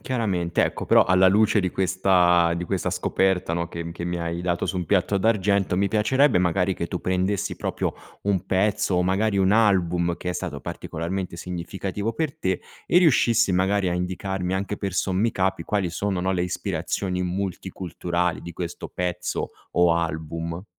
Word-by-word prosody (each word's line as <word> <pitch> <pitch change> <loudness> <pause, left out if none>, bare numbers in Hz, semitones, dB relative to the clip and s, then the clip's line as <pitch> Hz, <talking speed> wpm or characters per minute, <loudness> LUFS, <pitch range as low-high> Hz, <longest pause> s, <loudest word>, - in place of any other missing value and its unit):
Chiaramente. 95 -9 0
Ecco, - - -3
però - - +5
alla 95 +1 +5
luce 105 +2 +4
di 95 -1 -1
questa 90 -2 +3
di 90 - -3
questa 90 0 -1
scoperta, 95 0 0
no, 85 0 -1
che 85 0 -6
m 85 - -6
che 85 0 -6
mi 90 0 -2
hai 85 0 -3
dato 85 -1 -1
su 95 - -2
un 90 - -1
piatto 95 +3 +1
d'argento, 100 -3 +2
mi 100 +2 +2
piacerebbe 115 +5 +3
magari 90 +1 +1
che 85 - -4
tu 90 - -4
prendessi 95 +1 -1
proprio - - -2 0.3
un 100 -3 0
pezzo, 100 0 +1
o 90 - +3
magari 100 +3 +1
un 95 0 +3
album 90 -5 +2
che 90 - -4
è - - -2
stato 85 -5 -4
particolarmente 85 +5 -4
significativo 95 +5 -4
per 155 +1 -2
te, 95 -1 -1 0.2
e 175 - +4
riuscissi 120 - +4
magari 95 +1 +2
a - - 0
indicarmi 90 +1 -2
anche 100 +2 -2
per 100 -2 -3
sommi 95 +5 +1
capi 95 -1 -1
quali 100 -4 -1
sono, 95 +2 -2
no, 95 +1 0
le 90 -2 0
ispirazioni 90 +1 -2
multiculturali 90 -1 -2
di 85 - -8
questo 85 -1 -6
pezzo, 90 0 -3 0.2
o 85 -1 +4
album. 85 +1 -3
95 Hz, 175 wpm, -24 LUFS, 85-100 Hz, 0.3 s, però